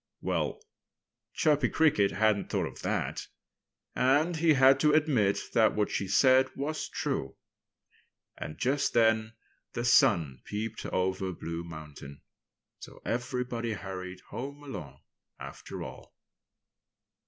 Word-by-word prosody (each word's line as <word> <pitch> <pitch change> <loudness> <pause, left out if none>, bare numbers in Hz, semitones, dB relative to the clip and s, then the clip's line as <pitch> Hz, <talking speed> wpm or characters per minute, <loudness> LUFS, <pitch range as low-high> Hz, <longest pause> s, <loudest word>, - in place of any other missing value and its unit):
Well, - - -2 0.8
Chirpy 145 -6 +3
Cricket 145 -11 +3
hadn't 110 0 +1
thought - - 0
of - - -8
that. - - -2 0.7
And 145 +7 +3
he 160 0 +4
had 135 0 +6
to 150 0 +4
admit 135 -11 +3
that 110 -1 +4
what 105 -1 0
she 100 - -2
said 130 +6 +5
was 155 +3 -3
true. - - -3 1.0
And 75 - -7
just 135 +2 0
then 110 -1 +3 0.4
the 120 - -3
sun 75 - +4
peeped 110 +1 -5
over 95 0 -1
Blue 85 0 -5
Mountain. 75 -4 -10 0.6
So - - -12
everybody 120 -1 -2
hurried 95 -2 -7
home 140 +3 -7
alone, 70 - -8 0.4
after - - -8
all. - - -11
115 Hz, 120 wpm, -29 LUFS, 95-135 Hz, 1.0 s, had